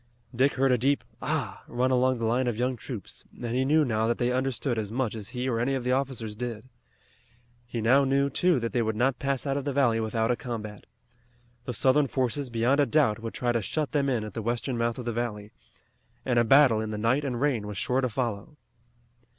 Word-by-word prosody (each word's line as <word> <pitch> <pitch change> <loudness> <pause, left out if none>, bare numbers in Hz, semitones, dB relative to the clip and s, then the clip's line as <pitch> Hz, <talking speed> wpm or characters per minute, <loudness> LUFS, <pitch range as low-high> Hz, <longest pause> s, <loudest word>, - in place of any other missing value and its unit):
Dick 135 +3 +2
heard 135 0 +3
a 125 - +3
deep 140 +4 +1 0.2
"Ah!" - - -2
run 125 +2 0
along 130 0 +2
the 115 - -2
line 125 +3 +1
of 120 -3 -1
young 125 +2 0
troops, 115 -2 -8 0.2
and 120 -1 -3
he 130 +1 +2
knew 150 +3 +3
now 110 -2 0
that 120 - 0
they 120 0 0
understood 130 -1 -1
as 105 -1 -4
much 125 -2 -1
as 105 -3 -7
he 125 +1 -3
or 115 -3 0
any 135 +3 +1
of 130 - -3
the 125 - 0
officers 125 -5 -2
did. 120 0 -5 1.0
He 120 -1 -4
now 130 +5 +5
knew, 140 +1 +2
too, 165 +2 +2
that 115 - -2
they 120 - +1
would 110 -1 -1
not 125 +3 +1
pass 140 -1 -1
out 140 0 0
of 140 - -2
the 145 - -2
valley 125 -5 +3
without 110 +1 0
a - - +2
combat. 110 -4 -7 0.8
The 125 - -3
Southern 135 +4 +3
forces, 130 +1 -1
beyond 120 +4 +1
a 145 - +4
doubt, 140 -9 +2
would 115 0 -6
try 120 -1 0
to 115 -1 0
shut 150 +8 -2
them 140 -2 +1
in 120 -5 0
at 105 - -7
the 115 - -4
western 120 +3 -2
mouth 115 0 -1
of 125 - -6
the 120 - -2
valley, 110 -3 -4 0.7
and 125 -2 +2
a - - +4
battle 125 -2 +5
in 110 - -4
the 105 - -4
night 115 +7 +1
and 125 -4 -2
rain 125 -7 0
was 105 -2 -6
sure 125 +6 0
to 130 - 0
follow. 115 +3 -3
125 Hz, 235 wpm, -27 LUFS, 115-135 Hz, 1.0 s, now